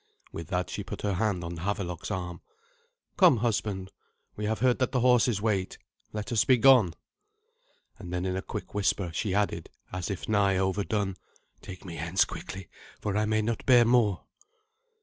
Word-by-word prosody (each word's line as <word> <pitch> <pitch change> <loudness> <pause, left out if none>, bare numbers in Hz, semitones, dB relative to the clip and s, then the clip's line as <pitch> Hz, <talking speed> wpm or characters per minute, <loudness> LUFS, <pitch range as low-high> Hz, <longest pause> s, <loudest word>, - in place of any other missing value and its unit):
With 80 - -7
that 90 -1 -2
she - - -4
put - - -7
her 100 -1 +1
hand 95 -2 0
on 85 0 -5
Havelok's 90 -1 -3
arm. 90 -4 -4 0.8
"Come, 130 - +6
husband; 105 -4 -1 0.4
we 105 - -4
have 110 +1 0
heard 125 0 +2
that 130 -1 +1
the 125 - +2
horses 120 -4 +3
wait. 100 -4 0 0.3
Let 105 -1 -5
us 110 -3 +3
be 130 - +4
gone." 115 -8 +6 1.0
And 90 -4 -8
then 90 +1 -2
in 95 0 -1
a 95 - -2
quick - - -7
whisper 100 -3 0
she 95 +3 -1
added, 100 -5 -1 0.2
as 90 +1 -3
if 100 - -4
nigh 100 -3 +3
overdone, 95 +1 -1 0.4
"Take 95 0 -10
me 85 -3 -7
hence 85 +4 +2
quickly, 95 -2 -8 0.3
for 105 -2 -2
I 105 +1 +2
may 110 0 +1
not 115 0 -2
bear 120 -2 +7
more." 115 -5 +3
100 Hz, 175 wpm, -28 LUFS, 90-110 Hz, 1.0 s, bear